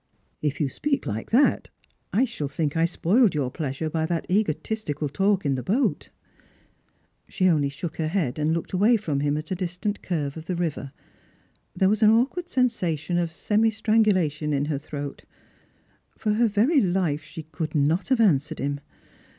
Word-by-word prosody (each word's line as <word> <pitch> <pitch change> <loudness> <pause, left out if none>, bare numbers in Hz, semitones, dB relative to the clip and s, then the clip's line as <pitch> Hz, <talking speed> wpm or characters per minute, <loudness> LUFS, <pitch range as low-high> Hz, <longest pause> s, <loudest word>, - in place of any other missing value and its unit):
" - - -44
If 145 - -14
you 150 - +1
speak 280 - -2
like 110 +2 -4
that, 265 +5 +3 0.4
I 240 +6 +3
shall 220 - -4
think 150 +1 -2
I 165 0 +3
spoiled 190 +5 +2
your 135 -4 -1
pleasure 150 0 -3
by 160 0 -1
that 170 -1 -2
egotistical 170 -5 -1
talk 195 +5 +1
in 140 - +2
the 130 - -2
boat." 210 - 0 1.2
She 185 - +1
only 150 -5 +3
shook 155 +4 -6
her 160 - -1
head 155 -7 -1
and 150 +1 +1
looked 165 +3 -3
away 210 +6 +4
from 155 -9 -2
him 145 +1 0
at 155 +3 -6
a - - +1
dis 180 -1 -4
tant 205 +2 -2
curve 150 -6 -2
of 160 - -8
the 185 - -1
river. 165 -5 -3 0.9
There 190 - +3
was 215 +2 +1
an 215 - +7
awkward 270 +11 +1
sensation 175 - 0
of 170 -1 0
eemi 215 +6 +1
strangulation 200 -9 +1
in 140 0 +1
her 145 -2 -2
throat. 145 -1 -7 0.9
For 215 - 0
her 230 +2 +3
very 235 +9 +3
life 175 -5 0
she 155 +1 -9
could 160 +1 -5
not 155 +5 +1
have 260 -2 +2
answered 160 -7 +2
him. 140 +1 -2
170 Hz, 185 wpm, -25 LUFS, 150-210 Hz, 1.2 s, an